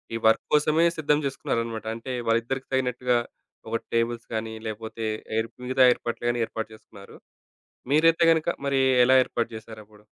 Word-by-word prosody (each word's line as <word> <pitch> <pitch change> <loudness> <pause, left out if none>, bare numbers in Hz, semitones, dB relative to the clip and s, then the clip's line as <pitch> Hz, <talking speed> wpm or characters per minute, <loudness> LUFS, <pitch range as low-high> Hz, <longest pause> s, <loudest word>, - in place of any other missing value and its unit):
ఈ - - 0
వర్క్ 110 - +3
కోసమే 155 +2 +4
సిద్ధం 150 -1 +2
జేసుకున్నారన్నమాట. 115 -4 -3
అంటే, 125 +3 -6 0.2
వాళ్ళిద్దరికీ 120 +4 0
తగినట్టుగా 125 -1 +1 0.5
ఒక 115 - -1
టేబుల్స్ 115 0 -1
కానీ 110 0 -3
లేపోతే, 110 +1 -5 0.3
ఏర్ 110 +1 -1 0.2
మిగతా 130 0 +4
ఏర్పాట్లు 120 0 -6
గాని 120 -1 0
ఏర్పాటు 110 -1 -5
చేసుకున్నారు. 100 -2 -15 0.7
మీరైతే 165 +3 +4
గనక 160 -1 -2 0.2
మరీ 135 -1 +2 0.2
ఎలా 130 +1 +6
ఏర్పాటు 115 - -2
చేసారప్పుడు? 110 -1 -13
115 Hz, 140 wpm, -25 LUFS, 110-135 Hz, 0.7 s, ఎలా